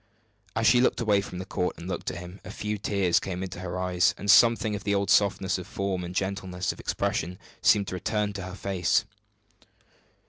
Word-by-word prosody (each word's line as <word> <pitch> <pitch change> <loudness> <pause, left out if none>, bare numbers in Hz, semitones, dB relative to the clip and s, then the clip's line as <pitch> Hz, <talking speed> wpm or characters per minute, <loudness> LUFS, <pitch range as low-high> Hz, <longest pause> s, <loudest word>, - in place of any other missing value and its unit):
As - - 0
she 120 - +6
looked 130 - +2
away 105 -4 +3
from 90 - -8
the 90 - -5
court 90 -1 -2
and 85 - -8
looked 95 - -3
at - - -6
him, 90 +2 -9
a - - -9
few 105 0 -4
tears 100 -3 +2
came 95 -1 -4
into 90 -2 -6
her 90 0 -4
eyes, 90 -1 +2
and 100 0 +3
something 115 +1 +5
of 100 - -6
the 100 0 +1
old 100 0 0
softness 100 -1 +2
of 90 - -8
form 95 -2 -2
and 90 +1 -7
gentleness 95 -1 -2
of - - -12
expression 90 +3 -2 0.2
seemed 100 -2 +4
to - - -6
return 105 +3 -1
to 100 - -5
her 95 0 -7
face. 95 -3 +1
95 Hz, 210 wpm, -27 LUFS, 90-100 Hz, 0.2 s, she